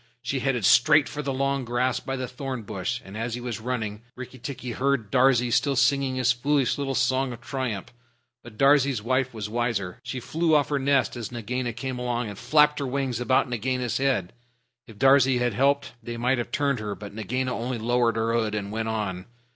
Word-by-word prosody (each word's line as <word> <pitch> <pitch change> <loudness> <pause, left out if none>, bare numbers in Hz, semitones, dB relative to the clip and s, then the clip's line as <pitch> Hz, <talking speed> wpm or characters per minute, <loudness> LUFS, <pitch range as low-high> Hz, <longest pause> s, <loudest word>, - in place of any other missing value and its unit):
She 135 - -1
headed 125 -5 0
straight 145 +6 +6
for 150 - -5
the 140 -1 -2
long 135 0 0
grass 120 +1 0
by 135 - -4
the 130 -1 -3
thorn 130 -1 -5
bush, 95 -2 -3
and 95 +1 -10
as 115 +1 -3
he - - -5
was 120 -2 -4
running 110 -3 -3
Rikki 130 0 -9
tikki 125 0 -6
heard 125 -3 0
Darzee 125 -2 +4
still 140 +3 +2
singing 135 0 +2
his 130 -1 +3
foolish 140 +2 +1
little 135 -1 -2
song 130 +1 +1
of 120 - -11
triumph. 125 -7 -4 0.5
But 115 -3 -13
Darzee's 135 -4 +4
wife 130 +2 +1
was 110 -3 -5
wiser. 110 -5 -2
She 130 - -5
flew 160 +5 +1
off 145 -2 +3
her 145 -1 0
nest 140 -1 +2
as 120 -2 -6
Nagaina 120 +1 -3
came 125 +2 -4
along, 120 -2 -2
and 100 - -8
flapped 150 +5 +4
her 140 - -2
wings 130 -2 -2
about 130 +2 +2
Nagaina's 125 +1 -1
head. 130 -10 0 0.5
If 110 - -13
Darzee 135 +1 +5
had 120 -2 0
helped 140 +5 +1
they 120 +1 -6
might 125 +2 +1
have 120 0 -4
turned 140 -3 0
her, 105 -1 -4
but 100 -1 -9
Nagaina 125 +4 -2
only 120 +1 -3
lowered 120 +1 +1
her 115 0 0
hood 110 -2 0
and 100 -1 -4
went 110 +1 -2
on. 100 -5 -3
125 Hz, 205 wpm, -25 LUFS, 115-135 Hz, 0.5 s, straight